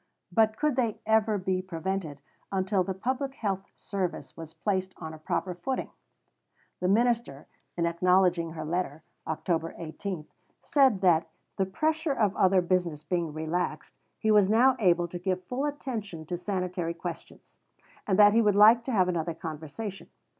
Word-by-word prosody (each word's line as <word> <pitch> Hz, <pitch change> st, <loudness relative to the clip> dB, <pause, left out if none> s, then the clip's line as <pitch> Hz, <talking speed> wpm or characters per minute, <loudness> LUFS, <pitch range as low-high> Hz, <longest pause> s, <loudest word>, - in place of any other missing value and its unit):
But 220 Hz, -1 st, +3 dB
could 300 Hz, -3 st, 0 dB
they 230 Hz, -5 st, 0 dB
ever 220 Hz, -1 st, +3 dB
be 185 Hz, -1 st, -1 dB
prevented 180 Hz, -4 st, -4 dB, 0.3 s
until 190 Hz, 0 st, +1 dB
the 190 Hz, 0 st, -4 dB
Public 260 Hz, +6 st, -2 dB
Health 195 Hz, -3 st, -2 dB
Service 190 Hz, -3 st, -4 dB
was 165 Hz, -1 st, -9 dB
placed 190 Hz, +2 st, -2 dB
on 160 Hz, -1 st, -7 dB
a 155 Hz, -, -10 dB
proper 180 Hz, +4 st, -2 dB
footing? 260 Hz, +9 st, -3 dB, 0.9 s
The 180 Hz, -, 0 dB
minister, 225 Hz, -, +1 dB, 0.3 s
in 170 Hz, -, +1 dB
acknowledging 175 Hz, -1 st, +2 dB
her 155 Hz, -1 st, -5 dB
letter 160 Hz, -2 st, -2 dB, 0.2 s
(Oct. 165 Hz, +1 st, -2 dB
18), 170 Hz, 0 st, -5 dB, 0.4 s
said 265 Hz, -, +3 dB
that, 165 Hz, -3 st, +3 dB, 0.3 s
the 190 Hz, -1 st, +1 dB
pressure 315 Hz, -, 0 dB
of 210 Hz, -6 st, +1 dB
other 185 Hz, -1 st, +4 dB
business 175 Hz, -4 st, 0 dB
being 170 Hz, -3 st, -1 dB
relaxed, 160 Hz, +4 st, -3 dB, 0.2 s
he 220 Hz, -, +1 dB
was 205 Hz, -2 st, +5 dB
now 245 Hz, +4 st, +5 dB
able 175 Hz, -4 st, +3 dB
to 175 Hz, +1 st, -7 dB
give 185 Hz, 0 st, -2 dB
full 250 Hz, +9 st, -2 dB
attention 220 Hz, -, -5 dB
to 175 Hz, -, -3 dB
sanitary 180 Hz, -2 st, -3 dB
questions, -, -, -9 dB, 0.5 s
and 190 Hz, -2 st, +2 dB
that 205 Hz, 0 st, +7 dB
he 230 Hz, -, +5 dB
would 210 Hz, -3 st, +3 dB
like 220 Hz, +3 st, +7 dB
to 265 Hz, -, -2 dB
have 190 Hz, -6 st, +3 dB
another 170 Hz, -2 st, -1 dB
conversation. 160 Hz, +6 st, -7 dB
185 Hz, 160 wpm, -28 LUFS, 170-215 Hz, 0.9 s, that